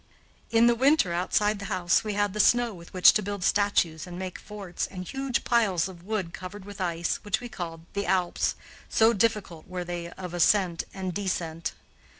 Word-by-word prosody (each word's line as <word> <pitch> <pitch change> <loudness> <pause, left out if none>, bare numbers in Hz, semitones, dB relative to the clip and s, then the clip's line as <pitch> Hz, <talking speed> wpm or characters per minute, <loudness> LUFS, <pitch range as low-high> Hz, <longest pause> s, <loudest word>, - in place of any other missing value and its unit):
In 230 0 +5
the 240 - +6
winter, 260 - +3
outside 205 +4 +1
the 200 - -6
house, 175 -1 +1
we 215 -1 -2
had 205 -1 0
the 210 - -5
snow 240 +2 +4
with 170 -2 -12
which 185 -1 +7
to 215 - +2
build 200 -2 -4
statues 175 -6 +1
and 175 0 -7
make 185 -1 -5
forts, 200 -4 -5
and 185 -2 -8
huge 270 -2 -2
piles 200 -8 +2
of 180 -3 -11
wood 190 -3 -3
covered 190 +2 -8
with 205 -1 -8
ice, 170 -1 -1
which 205 -2 -2
we 245 - -7
called 170 -7 -6
the 200 -2 -2
Alps, 180 -1 +1 0.3
so 225 +1 +4
difficult 200 -6 -1
were 185 -1 -4
they 175 -1 -5
of 180 -2 -7
ascent 175 0 +2
and 185 -2 -4
descent. 170 -4 -2
190 Hz, 190 wpm, -27 LUFS, 175-210 Hz, 0.3 s, which